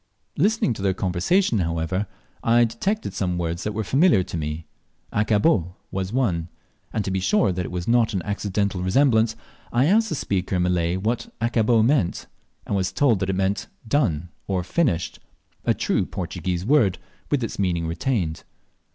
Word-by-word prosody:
Listening 205 - +2
to 105 - -8
their 95 -1 +1
conversation, 100 - +1
however, 85 +3 -1 0.4
I 120 +1 +5
detected 190 - -1
some 90 -2 -1
words 85 +1 -2
that 105 - -2
were 110 - -1
familiar 135 - +4
to 90 - -7
me. 75 0 -4 0.5
"Accabó" 105 - +2 0.2
was 95 0 -3
one; 95 -10 0 0.4
and 110 -2 -2
to 95 - -2
be 95 - 0
sure 185 - +2
that 90 -1 -2
it - - -8
was 90 -1 -4
not 115 -3 +3
an 90 - -1
accidental 100 -2 -1
resemblance, 110 +2 +3 0.4
I 120 +3 +3
asked 220 +6 +3
the - - -1
speaker 95 -7 -1
in 90 - +2
Malay 90 -1 +1
what 110 +5 -2
"accabó" 115 -1 +3
meant, 125 - +1 0.4
and - - -2
was 95 -1 0
told 120 -9 +2
it 95 0 0
meant 95 +3 0 0.2
"done 90 - +1 0.2
or 95 -2 0
finished," 95 - 0 0.5
a - - +3
true - - 0
Portuguese 90 0 -3
word, 115 -9 +3 0.3
with 140 -4 +1
its 115 - -4
meaning 85 -4 0
retained. 85 0 -1
100 Hz, 170 wpm, -23 LUFS, 90-120 Hz, 0.5 s, I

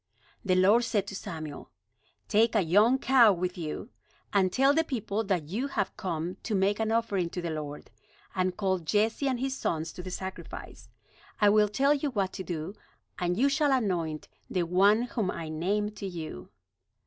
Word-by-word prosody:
The 185 -4 +2
Lord 200 +6 +5
said 205 -4 0
to 195 - -7
Samuel: 160 -7 -7 0.6
"Take 225 +2 +3
a 210 - +4
young 210 +10 +4
cow 260 -5 +6
with 180 0 -2
you; 165 +7 -5 0.4
and 190 -2 +3
tell 270 +6 +4
the 325 +2 +3
people 225 -7 -2
that 185 -5 0
you 235 +10 -2
have 200 -8 -2
come 175 -1 -3
to 220 - -2
make 200 +2 +2
an 220 0 0
offering 205 -6 0
to 180 - -5
the 170 -2 -3
Lord. 150 -2 -6 0.4
And 185 -1 -1
call 190 -2 +1
Jesse 215 - +1
and 255 -3 0
his 265 +1 -1
sons 160 -9 -2
to - - -7
the 185 - -7
sacrifice. 190 +1 -7 0.5
I 210 - +6
will 210 0 +4
tell 275 +7 +3
you 290 0 -1
what 200 -7 -1
to 190 - -5
do, 170 +1 -4 0.5
and 180 -1 0
you 265 +5 +4
shall 285 +1 +2
anoint 175 - -1 0.2
the 180 - 0
one 200 +6 +4
whom 230 -5 -2
I 165 -3 -4
name 200 +7 -1
to 205 -1 -6
you." 160 - -7
200 Hz, 185 wpm, -29 LUFS, 180-225 Hz, 0.6 s, cow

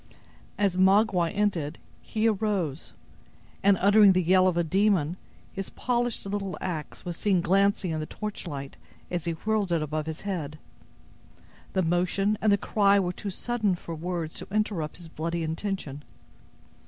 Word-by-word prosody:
As 200 -3 +1
Magua 190 -2 +4
ended 185 -8 -1 0.2
he 220 +1 0
arose 195 -9 -1 0.7
and, 200 -1 +5
uttering 205 0 +6
the 185 0 +2
yell 185 +2 +5
of 180 -2 +1
a 170 - +3
demon, 180 -2 +2 0.4
his 195 -1 -4
polished 245 -3 -1
little 195 -1 -3
axe 160 -5 -5
was 175 -1 -4
seen 195 +1 +2
glancing 195 +1 +2
in 160 - -2
the 155 - -4
torchlight 160 -10 -6 0.3
as 175 -3 -2
he 170 - 0
whirled 210 +2 -1
it 165 -2 +1
above 155 +1 -3
his 160 -1 -5
head. 160 -7 -4 1.2
The 190 - +2
motion 180 +5 +1
and 215 - +3
the 200 - +5
cry 200 0 +3
were 180 -2 -1
too 200 - -5
sudden 215 0 -1
for 170 -1 -8
words 165 0 -4
to - - -8
interrupt 195 -7 -1
his 170 -1 -11
bloody 165 +1 -3
intention. 160 -3 -4
185 Hz, 155 wpm, -27 LUFS, 165-205 Hz, 1.2 s, uttering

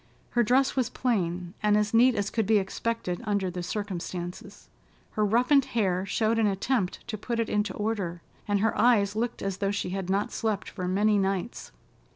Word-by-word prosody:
Her 240 - +3
dress 255 +4 +3
was 255 -4 +1
plain, 180 -7 -1
and 210 -1 +3
as 210 +1 0
neat 245 +2 +5
as 205 0 -1
could 220 -4 0
be 220 0 +5
expected 195 -1 -2
under 200 -4 0
the 180 0 -5
circumstances. 185 +1 -5 0.4
Her 215 - 0
roughened 250 +6 +4
hair 190 -3 +1
showed 220 +3 +1
an 220 - +3
attempt 200 +1 -1
to 215 -3 -4
put 235 +2 -3
it 230 - 0
into 210 0 0
order, 200 -6 -3 0.2
and 205 -1 +1
her 220 0 +1
eyes 210 -4 +3
looked 235 +2 -2
as 195 -1 -2
though 195 0 0
she 200 -3 -2
had 190 -1 -4
not 200 +2 0
slept 215 -3 -2
for 185 -3 -5
many 205 +3 +3
nights. 195 +3 -2
205 Hz, 190 wpm, -27 LUFS, 190-225 Hz, 0.4 s, neat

